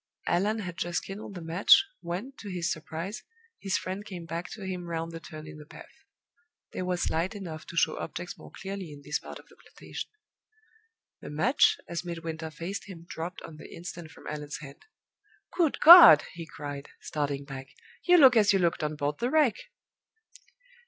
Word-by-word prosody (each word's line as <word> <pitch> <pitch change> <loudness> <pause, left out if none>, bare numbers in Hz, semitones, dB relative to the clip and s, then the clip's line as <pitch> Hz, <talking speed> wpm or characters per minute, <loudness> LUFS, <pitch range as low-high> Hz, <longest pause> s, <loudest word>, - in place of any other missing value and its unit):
Allan 205 +6 +1
had 180 -3 -6
just 175 0 -2
kindled 200 +1 -8
the 175 - -7
match, 180 - +5
when, 185 +10 -5
to 205 - -8
his 175 -2 -2
surprise, 165 +7 -5 0.4
his 195 -1 0
friend 190 +2 -5
came 180 -5 -8
back 170 +1 -5
to 215 - -8
him 180 -2 -4
round 165 0 -3
the 165 - -7
turn 155 -1 -10
in 155 0 -10
the 150 - -11
path. - - -14 0.7
There 185 - -4
was 180 -1 -1
light 175 +6 -1
enough 165 -6 -7
to 170 - -9
show 155 - +2
objects 175 +1 -6
more - - -13
clearly 195 -4 -7
in 145 -1 -12
this 150 +2 -2
part - - -9
of - - -17
the - - -20
plantation. - - -9 1.1
The - - -9
match, 160 - +3
as 170 0 -4
Midwinter 165 -2 -5
faced 170 +5 -6
him, 170 -4 -11
dropped 175 +2 -6
on 160 -2 -10
the - - -12
instant 170 -1 -8
from - - -16
Allan's 150 -1 -5
hand. 140 -2 -12 0.7
"Good 335 -5 +2
God!" 330 - +11
he 165 -1 -8
cried, 145 -2 -7
starting 140 -2 -3
back, 135 -1 -8 0.3
"you 355 0 +5
look 265 -6 +8
as 210 -2 +5
you - - +4
looked 170 -3 +1
on 150 0 -2
board 145 0 -2
the 240 - 0
Wreck!" 295 -6 +4
170 Hz, 185 wpm, -28 LUFS, 155-195 Hz, 1.1 s, God